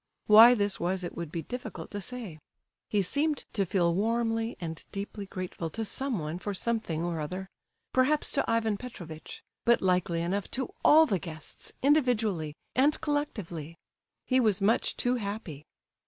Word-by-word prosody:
Why 225 +3 +9
this 205 -3 0
was 180 +2 -1
it 175 - -5
would 170 -3 -5
be 165 -1 -3
difficult 220 -6 -7
to 205 - -4
say. 210 -7 -6 0.5
He 205 -2 +2
seemed 290 - +1
to 195 -3 0
feel 170 -3 +2
warmly 225 +3 0
and 165 -2 -5
deeply 200 0 -5
grateful 185 -3 -5
to 225 +7 -3
someone 190 - -2
for 205 +1 -4
something 200 -7 -1
or 170 -2 -2
other—perhaps 195 - -2
to 275 - 0
Ivan 225 -2 +1
Petrovitch; 175 -10 -9 0.2
but 235 +1 +4
likely 180 -2 +1
enough 195 +4 -2
to 270 +9 -3
all 315 +1 +8
the 195 - 0
guests, 160 -2 -8
individually, 225 - +2 0.2
and 285 +4 +3
collectively. 185 - -3 0.5
He 255 0 +3
was 215 -5 +3
much 210 +4 +2
too 250 +1 +1
happy. 200 - -5
205 Hz, 155 wpm, -29 LUFS, 170-240 Hz, 0.5 s, Why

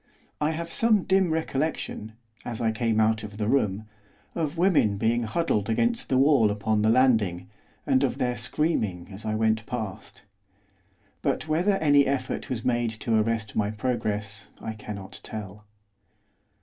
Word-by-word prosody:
I 150 - +2
have 165 +1 -4
some 220 -2 +3
dim 190 -1 +3
recollection, 155 -8 -2 0.3
as 120 -2 -5
I 115 -2 +1
came 110 -1 0
out 110 0 +3
of 105 -1 -8
the 105 -1 -1
room, 110 -5 +1 0.5
of 160 -1 -2
women 165 - +3
being 115 +3 +1
huddled 110 - 0
against 235 - 0
the 130 - +3
wall 135 -5 +5
upon 105 +1 0
the 110 - +3
landing, 110 -7 +2 0.3
and 135 0 +3
of 130 -1 0
their 125 -2 0
screaming 110 - -1
as 100 +3 -9
I 110 0 -1
went 110 0 +1
past. 110 -4 -6 1.0
But - - -1
whether 170 +6 +2
any 145 -6 +4
effort 135 -2 -2
was 115 -3 -3
made 120 -2 +1
to 115 - +1
arrest 110 0 0
my 105 -1 +1
progress 105 -2 -3
I 110 - -5
cannot 105 -3 -8
tell. 105 -1 -8
115 Hz, 155 wpm, -26 LUFS, 105-140 Hz, 1.0 s, wall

